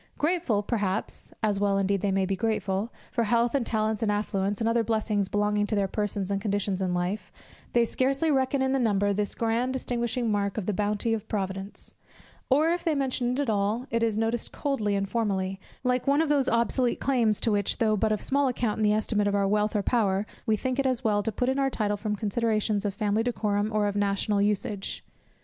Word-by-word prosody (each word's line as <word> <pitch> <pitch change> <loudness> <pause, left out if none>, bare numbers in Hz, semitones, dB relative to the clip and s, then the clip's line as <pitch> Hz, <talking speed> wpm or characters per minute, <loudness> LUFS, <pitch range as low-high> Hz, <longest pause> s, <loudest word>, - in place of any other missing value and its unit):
Grateful, 300 - +1
perhaps, 205 -4 -2
(as 205 -2 +1
well 200 -1 +2
indeed 195 0 +1
they 200 - 0
may 190 0 +1
be 195 +1 -1
grateful) 210 +1 -1 0.2
for 235 -2 0
health, 235 +2 +2
and 270 -5 0
talents, 220 -1 0
and 215 -2 +1
affluence, 205 -1 -1
and 225 - 0
other 230 0 +2
blessings 215 -3 0
belonging 210 0 +1
to 215 - -1
their 200 -1 +1
persons 200 -1 -2
and 200 0 -1
conditions 200 -2 -1
in 185 -1 0
life, 180 +4 -2 0.4
they 235 -1 +4
scarcely 275 +6 +1
reckon 265 0 +1
in 265 - +1
the 270 - +2
number 205 -4 +2
this 205 0 -2
grand 230 +3 0
distinguishing 240 -2 -1
mark 200 0 -1
of 210 - -2
the 210 - 0
bounty 210 +3 0
of 220 -1 -3
Providence; 195 -1 -4 0.6
or 300 +5 +4
if 345 +1 0
they 320 -2 +1
mention 255 -3 0
it 260 - -2
at 285 - -2
all, 210 +4 0
it 230 - +1
is 225 -2 +1
noticed 225 +1 -1
coldly 220 -8 -1
and 195 0 -1
formally, 195 -3 -1 0.2
like 250 +1 0
one 280 +1 +4
of 315 - -2
those 285 -3 +2
obsolete 235 +2 +1
claims 235 -6 +2
to 225 - +1
which, 205 -1 0
though 220 -3 +2
but 215 +1 +1
of 215 - 0
small 280 0 +2
account 240 -4 -1
in - - +1
the 210 0 +4
estimate 210 -1 +1
of 205 - +1
our 200 -1 +2
wealth 210 +1 +1
or 205 - +1
power, 205 -4 +1 0.2
we 220 -1 +3
think 260 +3 -2
it 275 - +2
as 255 -1 0
well 210 -2 +2
to 225 - -2
put 245 +4 -1
in 265 +1 +1
our 270 0 +2
title 210 -5 0
from 210 +1 -2
considerations 215 0 0
of 200 -1 -2
family 210 0 +1
decorum 210 -3 0
or 210 -1 +1
of 205 0 -1
national 200 0 +1
usage. 205 -1 -2
215 Hz, 220 wpm, -27 LUFS, 205-240 Hz, 0.6 s, they